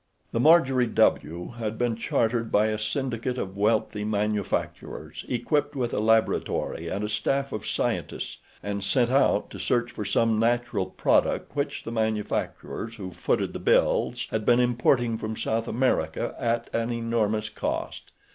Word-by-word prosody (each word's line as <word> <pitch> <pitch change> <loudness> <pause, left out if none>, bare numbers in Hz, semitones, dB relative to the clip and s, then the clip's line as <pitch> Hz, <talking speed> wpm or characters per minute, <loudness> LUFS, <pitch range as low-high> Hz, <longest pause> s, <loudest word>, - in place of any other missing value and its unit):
The 115 - -1
Marjorie 135 -4 +5
W. 85 -5 +1
had 110 -1 -3
been 120 -1 0
chartered 115 0 0
by 105 +1 +4
a 110 0 -2
syndicate 125 +2 -2
of 95 -5 -4
wealthy 105 0 +1
manufacturers, 105 -1 -2
equipped 145 +4 0
with 120 -3 -1
a - - 0
laboratory 110 -6 +1
and 100 +5 -2
a - - -1
staff 135 +6 -1
of 110 - -5
scientists, - - -2 0.3
and 100 -1 -3
sent 120 +4 +2
out 135 +1 +3
to - - -8
search 120 -1 0
for - - -5
some 110 +2 +2
natural 115 -4 +1
product - - +1
which - - -2
the 115 - -5
manufacturers 110 0 -2
who 95 -4 -7
footed - - -1
the - - -5
bills 120 +1 +2
had 110 -1 -1
been 120 +3 +4
importing 120 -1 +2
from 110 0 -4
South 115 +1 -1
America 115 -11 0
at 115 0 0
an 115 +1 0
enormous 110 -2 0
cost. 110 - -4
115 Hz, 155 wpm, -26 LUFS, 105-120 Hz, 0.3 s, Marjorie